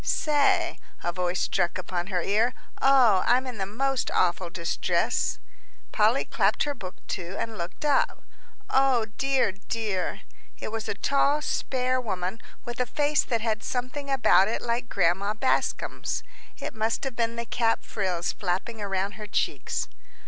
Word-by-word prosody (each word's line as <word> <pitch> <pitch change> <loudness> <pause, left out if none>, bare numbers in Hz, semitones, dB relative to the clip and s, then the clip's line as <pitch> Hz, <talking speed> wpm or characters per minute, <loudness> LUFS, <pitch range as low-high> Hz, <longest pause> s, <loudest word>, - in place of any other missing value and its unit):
"Say," 300 - +2 0.2
a 175 - 0
voice 180 0 -1
struck 175 - +1
upon 180 -1 -3
her 180 -3 -1
ear, 220 +5 +2 0.3
"oh, 250 -8 +6
I'm 250 +2 +4
in 250 -5 -6
the 190 - -1
most 270 +5 0
awful 180 0 +1
distress." 170 -1 0 0.5
Polly - - +3
clapped - - +2
her 290 - -1
book 185 -8 -8
to, 180 +1 -4
and 225 -1 -3
looked 175 - -5
up. 290 -2 +2 0.4
"O 265 -4 +3
dear, 270 -6 +2
dear!" 195 -1 -3 0.4
It - - -5
was 225 0 -4
a - - -1
tall, 280 +6 +2
spare 255 -3 0
woman 190 -1 -3 0.2
with 240 0 -6
a 250 - +1
face 295 +4 +2
that 230 -3 0
had 220 -1 0
something 255 +4 -3
about 245 -7 +5
it 225 - -2
like 235 0 -1
Grandma 195 +3 +1
Bascom's. 260 +4 0 0.3
It - - -5
must 220 +1 -1
have 270 -3 -3
been 230 -1 0
the 235 0 -3
cap 230 -1 +1
frills 180 -5 -1
flapping 200 +4 -2
around 195 0 -1
her 210 0 -8
cheeks. - - -1
225 Hz, 155 wpm, -27 LUFS, 190-255 Hz, 0.5 s, oh